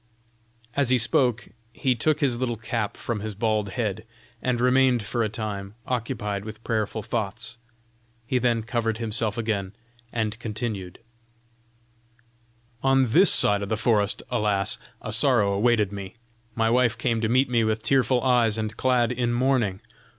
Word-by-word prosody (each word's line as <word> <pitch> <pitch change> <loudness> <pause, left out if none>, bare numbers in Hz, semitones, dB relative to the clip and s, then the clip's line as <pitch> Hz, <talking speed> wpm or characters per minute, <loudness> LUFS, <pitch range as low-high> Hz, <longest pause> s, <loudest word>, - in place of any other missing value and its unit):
As 140 -3 +2
he 130 - +4
spoke 120 -1 +1 0.2
he 130 +2 +1
took 150 +6 0
his 125 -5 +1
little 125 -2 -1
cap 110 -1 -3
from 115 -3 -3
his 105 0 -5
bald 105 -1 0
head, 110 -3 -2 0.4
and 125 -2 0
remained 125 -1 +3
for 115 +3 -2
a 110 - +1
time 100 -2 -5
occupied 110 -5 -3
with 110 +1 -9
prayerful 110 -1 -2
thoughts; 115 +1 -4 0.7
he 125 +2 0
then 120 -2 +1
covered 115 -1 -1
himself 110 -1 -2
again, 100 -4 -2 0.4
and 110 -1 -2
continued: 105 -5 -5 1.8
"On 135 -3 +3
this 190 - +7
side 105 0 +5
the 110 - 0
forest, 105 -2 +1
alas! 105 -1 0 0.2
a 110 - -4
sorrow 115 -4 +3
awaited 105 -1 +2
me. 100 -1 -7 0.4
My 115 -1 +2
wife 120 -2 +2
came 115 -3 0
to 110 - 0
meet 130 +3 +3
me 120 -2 +3
with 110 0 -1
tearful 130 0 +2
eyes 120 -4 +3
and 110 0 -3
clad 125 -2 +2
in 120 -1 -1
mourning. 120 -6 +1
115 Hz, 150 wpm, -25 LUFS, 105-125 Hz, 1.8 s, this